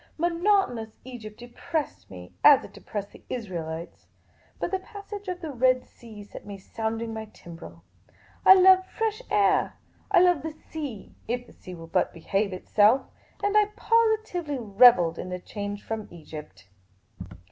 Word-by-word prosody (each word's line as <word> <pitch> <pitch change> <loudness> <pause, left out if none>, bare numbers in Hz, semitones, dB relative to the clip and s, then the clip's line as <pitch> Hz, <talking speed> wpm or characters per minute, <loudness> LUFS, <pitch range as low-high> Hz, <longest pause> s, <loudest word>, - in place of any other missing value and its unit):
Monotonous 340 - +1
Egypt 220 -5 -9
depressed 260 +5 -5
nie, 90 -1 -11
as 290 -3 +8
it - - -12
depressed 205 -1 -6
the - - -16
Israelites; 170 -8 -6 0.5
but - - -2
the 380 - 0
passage 405 0 -9
of 360 -1 -4
the 320 -3 -5
Red 255 0 +2
Sea 220 -3 -13
set 205 - -11
me 200 -1 -8
sounding 225 +3 -4
my 220 0 -5
timbrel. 175 -5 -13 0.6
I 380 - +10
love 375 0 +7
fresh 445 +3 -2
air; 200 -2 +2 0.3
I 380 -4 +5
love 355 -5 +4
the 320 0 -5 0.2
sea, 285 -10 -6
if 245 +1 -2
the - - -17
sea 185 - -11
will 165 -1 -10
but 165 - 0
behave 195 +5 -1
itself; 210 +7 +3 0.4
and 405 +1 +1
I 425 0 +6
positively 440 -10 +1
revelled 205 -7 +5
in 185 - -5
the 180 - -3
change 205 +2 -6
from 220 -1 -5
Egypt. 155 - -11
235 Hz, 155 wpm, -26 LUFS, -, 0.6 s, I